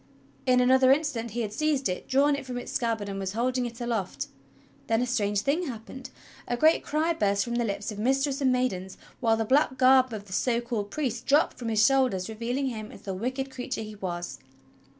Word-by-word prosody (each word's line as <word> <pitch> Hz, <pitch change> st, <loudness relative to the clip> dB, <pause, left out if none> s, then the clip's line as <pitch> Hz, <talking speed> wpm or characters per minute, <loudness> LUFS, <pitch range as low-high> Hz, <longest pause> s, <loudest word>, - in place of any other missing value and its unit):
In 250 Hz, -1 st, +5 dB
another 260 Hz, +1 st, +5 dB
instant 270 Hz, -6 st, +1 dB
he 235 Hz, +3 st, -3 dB
had 210 Hz, -2 st, -3 dB
seized 290 Hz, 0 st, +1 dB
it, 180 Hz, -, -4 dB
drawn 280 Hz, +2 st, +3 dB
it 280 Hz, -, -5 dB
from 250 Hz, -2 st, -5 dB
its 245 Hz, -, -6 dB
scabbard, 225 Hz, -4 st, -1 dB
and 195 Hz, -1 st, -4 dB
was 190 Hz, 0 st, -3 dB
holding 250 Hz, +2 st, 0 dB
it 235 Hz, +1 st, -10 dB
aloft. 220 Hz, -, -3 dB, 0.6 s
Then 225 Hz, 0 st, +2 dB
a -, -, +1 dB
strange 205 Hz, -5 st, 0 dB
thing 315 Hz, +9 st, 0 dB
happened: 255 Hz, +2 st, -8 dB, 0.4 s
A 245 Hz, -, -1 dB
great 315 Hz, +5 st, +4 dB
cry 315 Hz, +3 st, 0 dB
burst 200 Hz, -8 st, +1 dB
from 235 Hz, -, -4 dB
the 240 Hz, -, +1 dB
lips 200 Hz, -1 st, -3 dB
of 210 Hz, -, -7 dB
mistress 270 Hz, +4 st, +1 dB
and 260 Hz, -2 st, +3 dB
maidens, 190 Hz, -7 st, -1 dB, 0.2 s
while 225 Hz, -2 st, +2 dB
the 225 Hz, -, 0 dB
black 260 Hz, +2 st, +2 dB
garb 260 Hz, -1 st, +5 dB
of 210 Hz, -2 st, -6 dB
the 190 Hz, -, -9 dB
so 235 Hz, +4 st, +1 dB
called 230 Hz, -4 st, -3 dB
priest 250 Hz, -3 st, -3 dB
dropped 290 Hz, +3 st, +3 dB
from 235 Hz, -2 st, -3 dB
his 220 Hz, -1 st, +4 dB
shoulders 255 Hz, -9 st, +2 dB
revealing 235 Hz, +5 st, -2 dB
him 215 Hz, -3 st, -6 dB
as -, -, -13 dB
the 195 Hz, -, -4 dB
wicked 260 Hz, +7 st, -3 dB
creature 250 Hz, -3 st, -4 dB
he 215 Hz, 0 st, -8 dB
was. 175 Hz, -8 st, -5 dB
240 Hz, 215 wpm, -27 LUFS, 210-265 Hz, 0.6 s, In